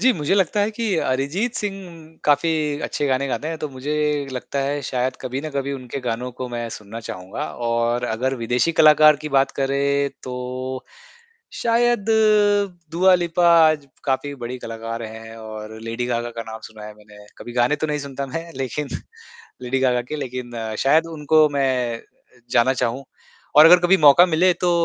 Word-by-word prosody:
जी, 255 +1 +5
मुझे 150 -3 0
लगता 195 +1 +1
है 205 +1 +1
कि 215 -4 -1
अरिजीत 150 - -1
सिंह 205 -6 -3 0.5
काफ़ी 150 0 +1
अच्छे 145 - -2
गाने 135 0 0
गाते 150 +4 -3
हैं, 165 -1 -4
तो 155 - -4
मुझे 140 +2 -4 0.4
लगता 130 +2 -4
है 140 +1 -1
शायद 130 0 -2
कभी 130 +2 -4
ना 155 +1 -6
कभी 140 0 -2
उनके 130 0 -6
गानों 125 0 -3
को 125 +1 -6
मैं 120 -1 -4
सुनना 105 +2 -9
चाहूँगा 95 +5 -6 0.2
और 115 +1 0
अगर 125 +3 -1
विदेशी 125 +7 0
कलाकार 155 -1 +6
की 150 +1 -7
बात 135 -1 +2
करें, 140 +1 +1
तो 130 +1 -5 0.8
शायद 235 -2 +2 0.9
दुआ 185 +3 +4
लिपा 175 0 +1 0.2
आज 150 -2 -1 0.2
काफ़ी 140 +1 -1
बड़ी 125 -1 -6
कलाकार 115 0 -6
हैं 110 0 -9
और 110 0 -8
लेडी 115 +2 -3
गागा 120 -1 -2
का 115 - -3
नाम 110 0 -9
सुना 110 -1 -11
है 105 - -10
मैंने। 105 -1 -16
कभी 120 - -9
गाने 120 +4 +2
तो 155 - -2
नहीं 150 -1 -2
सुनता 140 -1 -5
मैं 165 +6 -6
लेक़िन 135 +2 -3 0.7
लेडी 125 +2 -1
गागा 125 -2 +2
के, 125 +5 -6
लेक़िन 120 -5 -5
शायद 155 +4 +3
उनको 155 -1 +3
मैं 130 -4 0
अ, - - -17 0.5
जाना 120 +1 +3
चाहूँ। 130 +2 -2 0.5
और 150 +1 +10
अगर 180 +2 +8
कभी 180 +2 +4
मौका 150 +3 +7
मिले 180 +2 +3
तो 180 - +2
135 Hz, 175 wpm, -21 LUFS, 120-155 Hz, 0.9 s, और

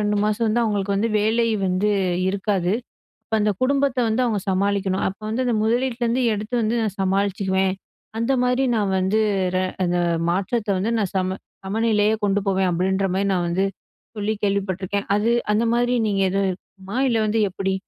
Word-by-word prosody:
2 210 0 +1
மாசம் 215 +2 +1
வந்து 235 +2 +2
அவங்களுக்கு 200 -2 0
வந்து 215 +3 +1
வேலை 220 +3 +2 0.2
வந்து 185 +3 +1 0.4
இருக்காது. 195 -2 0 0.5
அப்ப - - -50
அந்த 210 0 +2
குடும்பத்த 275 -1 +1
வந்து 220 +3 +1
அவங்க 215 -4 0
சமாளிக்கணும். 195 0 0
அப்ப 190 - -8
வந்து 235 +4 -1
அந்த 240 - +1
முதலீட்டுலேருந்து 240 +1 0
எடுத்து 210 +3 -5
வந்து 225 +2 0
நான் 210 -3 -2
சமாளிச்சிக்குவேன். 190 0 +1 0.4
அந்த 230 +4 +1
மாரி 250 +1 +2
நான் 205 -3 0
வந்து 190 +4 +1 0.4
ர - - +2 0.2
அந்த 175 0 0 0.3
மாற்றத்த 200 +5 -1
வந்து 205 +5 -1
நான் 200 -4 -1
சம 185 0 0 0.3
சமநிலையே 215 +1 +2
கொண்டு 200 0 +2
போவேன். 190 -1 +2
அப்டீன்ற 190 +3 +1
மாரி 195 +1 0
நான் 175 -1 0
வந்து 180 +3 +1 0.5
சொல்லி 210 +1 -1
கேள்விப்பட்டுருக்கேன். 200 0 -1
அது 215 +3 +1 0.2
அந்த 215 +2 +2
மாரி 245 +1 +1
நீங்க 200 -1 0
எதுவும் 195 0 +1
இருக்குமா 190 +3 -10
இல்ல, 235 -2 +1
வந்து 215 +1 0
எப்டி? 190 +1 -2
205 Hz, 170 wpm, -22 LUFS, 190-225 Hz, 0.5 s, வந்து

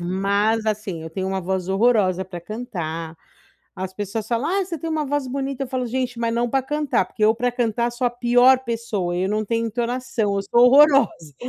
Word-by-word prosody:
mas, 200 +5 0
assim, 205 -6 -3
eu 160 - -8
tenho 190 +3 -3
uma 190 0 -2
voz 185 0 -3
horrorosa 195 -3 +2
para 175 -2 -8
cantar, 170 -7 -5 0.6
as 190 0 -5
pessoas 205 +2 -4
falam: 235 +3 -1
"Ai, 385 +1 0
você 340 -3 -5
tem 330 - -4
uma 310 -2 -1
voz 285 -1 -2
bonita", 275 0 -3
eu - - -7
falo: 255 -1 -2
"Gente, 245 0 -3
mas 230 -1 -1
não 240 0 0
para 270 0 0
cantar", 295 -6 0
porque 215 - -4
eu 220 +1 +4
para 245 +1 0
cantar 235 -1 -1
sou 245 +1 0
a - - -1
pior 245 +2 +4
pessoa, 220 -7 -3
eu 185 +2 0
não 215 0 -1
tenho 230 +1 -1
entonação, 235 -2 -2
eu 195 - 0
sou 235 +4 +3
horrorosa. 275 - +4
230 Hz, 210 wpm, -22 LUFS, 190-250 Hz, 0.6 s, eu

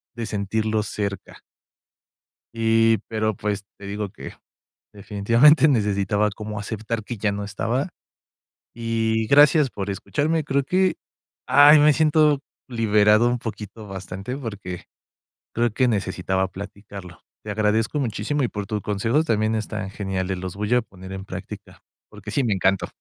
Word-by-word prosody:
de 115 -1 -4
sentirlo 110 +1 -1
cerca. 100 -1 -5 1.1
Y, 115 0 +3
pero, 110 -1 -1
pues, 105 0 -3
te 100 - -11
digo, 100 0 -4
que - - -10 0.6
definitivamente 115 +9 +4
necesitaba 105 -4 +1
como 105 +1 -6
aceptar 110 +2 -4
que 120 +2 -6
ya 105 0 0
no 100 0 -4
estaba. 115 - -2 0.9
Y 115 -1 -1
gracias 145 +1 +5
por 100 -2 -5
escucharme. 155 +10 -1
Creo 140 0 +1
que, 185 +5 +1 0.5
ay, 145 +2 +8
me 150 +1 +6
siento 155 -2 +3 0.3
liberado 110 -1 +3
un 120 0 0
poquito, 110 -2 -7
bastante, 95 +5 -6
porque 105 -8 -7 0.7
creo 120 0 +1
que 125 +4 +2
necesitaba 95 -3 -1
platicarlo. 100 -1 -10 0.2
Te 105 - -5
agradezco 110 +6 0
muchísimo, 120 +4 -2
y 125 - +2
por 105 -2 -5
tus 105 +1 -3
consejos 115 +10 0
también 110 -4 +1
están 105 -2 -4
geniales, 95 -2 -3
los 95 0 -6
voy 105 +4 -1
a 125 - +4
poner 95 -4 -12
en 95 0 -6
práctica, - - -9 0.3
porque - - -10
sí 140 - +1
me 115 -4 +1
encantó. 95 0 +1
110 Hz, 145 wpm, -23 LUFS, 100-120 Hz, 1.1 s, ay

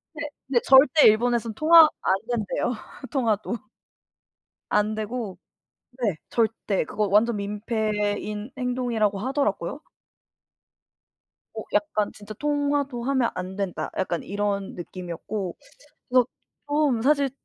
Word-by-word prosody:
네. 325 - -5 0.2
근데 260 -3 +3
절대 270 +2 +7
일본에선 235 +1 +2
통화 320 +5 +8
안 - - +2 0.2
된대요 240 +1 -1 0.4
통화도. 235 -4 0 1.1
안 210 +1 +2
되고 215 -3 -4 0.7
네 205 -8 +1
절대. 220 -5 0
그거 210 +6 -1
완전 215 +3 +3
민폐인 210 +1 -2
행동이라고 245 -5 0
하더라고요. 260 - -1 1.7
어 - - -5
약간 215 -9 +1
진짜 210 +1 -10
'통화도 285 -3 -1
하면 260 -2 +1
안 185 +1 -5
된다.' 195 -2 -3
약간 175 -3 -1
이런 200 -1 -2
느낌이었고 180 +2 -5 0.5
그래서 250 -1 +4 0.4
좀 290 -6 +2
사실 280 0 +3
220 Hz, 235 characters per minute, -25 LUFS, 205-260 Hz, 1.7 s, 통화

